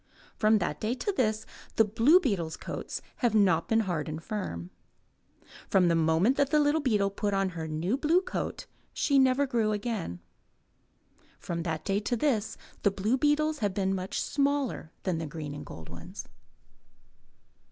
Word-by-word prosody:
From 215 0 +4
that 175 -6 -2
day 220 +3 0
to 335 +11 -1
this 220 - 0 0.3
the 225 - +5
blue 230 - +5
beetles' 180 - -1
coats - - -5
have 240 -4 +1
not 180 -6 +3
been 225 0 +3
hard 170 -7 -2
and 155 0 -4
firm. 95 - -4 1.0
From 180 -3 +4
the 170 - +3
moment 165 +10 +3
that 280 -1 +2
the 300 - +4
little 295 +2 +3
beetle 210 -7 +2
put 205 0 -1
on 195 -1 +1
her 165 -3 -5
new 165 +10 -1
blue 320 +5 +3
coat - - -4 0.3
she 280 -3 +3
never 265 +1 +4
grew 230 -5 +1
again. 205 - -3 1.2
From 170 -1 -4
that 165 -2 -3
day 195 0 +1
to 230 +4 -1
this 225 -5 0 0.2
the 200 - +4
blue 200 +5 0
beetles 300 +2 +2
have 205 -4 -1
been 195 -1 +1
much 185 0 -3
smaller 280 - 0
than 180 -4 -1
the 160 - -4
green 150 -1 -6
and 145 - -8
gold 80 0 -9
ones. - - -9
210 Hz, 170 wpm, -29 LUFS, 170-260 Hz, 1.2 s, the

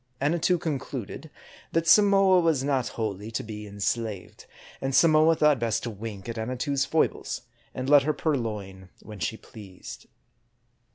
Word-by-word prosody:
Annatoo 170 +5 +1
concluded 145 - -5 0.4
that 165 0 +1
Samoa 195 -1 +6
was 160 -6 +1
not 135 -3 0
wholly 105 -2 -3
to 115 - -4
be 105 -1 -8
enslaved; 100 0 -4 0.3
and 135 0 -1
Samoa 155 +2 +5
thought 150 -4 +3
best 115 -2 -1
to 120 - -4
wink 105 -1 -8
at 115 -1 -5
Annatoo's 130 +4 -1
foibles, - - -1 0.3
and 130 0 -4
let 145 0 +7
her 155 +3 0
purloin 105 - -3
when 105 -2 -10
she 95 +7 -2
pleased. 100 -7 -12
125 Hz, 140 wpm, -26 LUFS, 105-155 Hz, 0.4 s, let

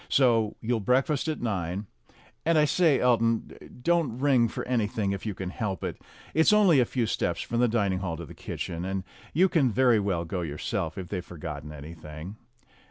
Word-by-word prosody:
So 115 -5 +3
you'll 115 0 0
breakfast 130 +7 +1
at 155 - -2
nine. 95 -2 -2 0.6
And 165 0 +3
I 150 - +5
say, 150 -2 +3
Elton, 115 -2 +2 0.3
don't 170 -8 +2
ring 130 -3 +4
for - - -5
anything 110 -4 0
if 100 +2 -4
you 105 - -3
can 90 0 -5
help 100 -4 -3
it. - - -4 0.3
It's 160 +4 +5
only 200 -9 +6
a 125 - +4
few 120 0 -1
steps 85 -5 -1
from 120 - -2
the 125 - +4
dining 100 -5 +1
hall 85 -4 -3
to 85 - -6
the - - -11
kitchen, 85 0 -5
and 95 0 -2 0.3
you 185 +4 +4
can 160 -8 +3
very 125 -1 +4
well 95 -4 -1
go 90 +2 -3
yourself 80 0 -3
if 90 -2 -6
they've 90 -3 -3
forgotten 75 -4 -7
anything." 75 +5 -9
110 Hz, 190 wpm, -27 LUFS, 90-130 Hz, 0.6 s, only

